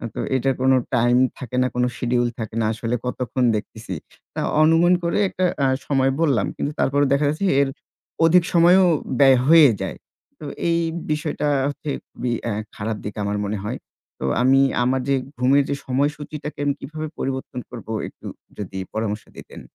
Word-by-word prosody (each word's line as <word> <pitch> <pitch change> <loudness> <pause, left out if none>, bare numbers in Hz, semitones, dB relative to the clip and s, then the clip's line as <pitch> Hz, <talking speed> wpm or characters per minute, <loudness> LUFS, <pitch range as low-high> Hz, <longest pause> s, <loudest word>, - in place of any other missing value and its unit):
তো - - -4 0.2
এটার 130 0 +1
কোন 130 - +4 0.2
time 120 +1 +3 0.2
থাকে 125 -1 -7
না, 130 - +3
কোন 125 - +1
schedule 120 0 0
থাকে 110 -1 -5
না - - +1
আসলে 115 +2 -2
কতক্ষণ 125 0 -2
দেখতেছি। 105 -2 -6 0.4
আ - - 0 0.2
অনুমান 165 +3 +5
করে 170 - 0
একটা 185 - -1 0.2
আ - - +4 0.2
সময় 135 -1 +2
বললাম 140 -8 +2
কিন্তু 145 - -2
তারপরেও 145 +1 +2
দেখা 140 +2 +2
যাচ্ছে 155 +7 -2 0.2
এর 140 - +1 0.6
অধিক 175 +2 +5
সময়ও 175 +2 +6 0.3
ব্যয় 135 -2 +7
হয়েই 155 -3 +7
যায়। - - -4 0.4
তো - - -8 0.2
এই 170 0 +2 0.3
বিষয়টা 150 -1 -1 0.2
হচ্ছে 145 +1 -6 0.2
খুবই 125 -1 -3 0.2
আ - - -1 0.2
খারাপ 110 +1 -3
দিক 105 - -6
আমার 100 0 -1
মনে 105 +1 -2
হয়। 105 - -3 0.4
তো - - -3 0.2
আমি 130 +2 +5 0.2
আমার 130 +1 +1
যে 140 - +4 0.2
ঘুমের 135 +3 +4
যে 140 - 0
সময়সূচিটাকে 145 +3 -3
আমি 140 - +2
কিভাবে 155 +2 -6
পরিবর্তন 130 -1 -4
করব 120 -3 -10 0.2
একটু - - -15 0.3
যদি 100 -2 -6 0.2
পরামর্শ 110 -1 -2
দিতেন। - - -11
135 Hz, 170 wpm, -22 LUFS, 120-150 Hz, 0.6 s, ব্যয়